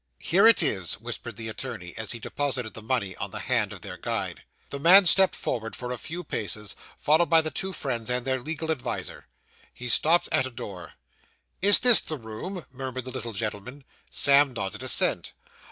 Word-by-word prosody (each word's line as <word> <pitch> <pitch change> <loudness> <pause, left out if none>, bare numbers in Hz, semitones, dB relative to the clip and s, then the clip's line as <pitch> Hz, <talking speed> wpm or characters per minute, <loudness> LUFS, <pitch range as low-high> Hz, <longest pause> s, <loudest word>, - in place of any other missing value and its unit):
'Here 195 +6 +3
it 230 - +5
is,' 95 -4 -1
whispered 120 0 -8
the 110 +1 -6
attorney, 110 -6 -7
as 110 -2 -5
he - - -5
deposited 125 -1 -4
the 115 - -9
money 110 -5 -2
on 100 - -5
the - - -8
hand 115 -5 0
of 100 - -10
their 95 -3 -9
guide. - - -4 0.3
The 140 - -5
man 185 +6 +7
stepped 190 +2 +7
forward 115 -2 -4
for 125 0 -6
a 125 - -4
few 175 +3 -6
paces, 105 - -3 0.2
followed 160 +3 +2
by 165 -1 +5
the 155 0 -5
two 190 0 -4
friends 125 -9 -4
and 125 0 -2
their 130 -1 -1
legal 160 +3 -4
adviser. 145 -6 -5 0.4
He 125 0 -7
stopped 165 +8 +4
at 130 - +1
a - - -8
door. 95 -8 -9 0.7
'Is 205 +2 +9
this 245 -3 +8
the 155 - -6
room?' 130 - -8
murmured 130 -1 -6
the 130 - -7
little 120 -3 -6
gentleman. 110 +6 -6 0.3
Sam 140 -1 +4
nodded 95 -5 -5
assent. - - 0
125 Hz, 190 wpm, -25 LUFS, 110-155 Hz, 0.7 s, Is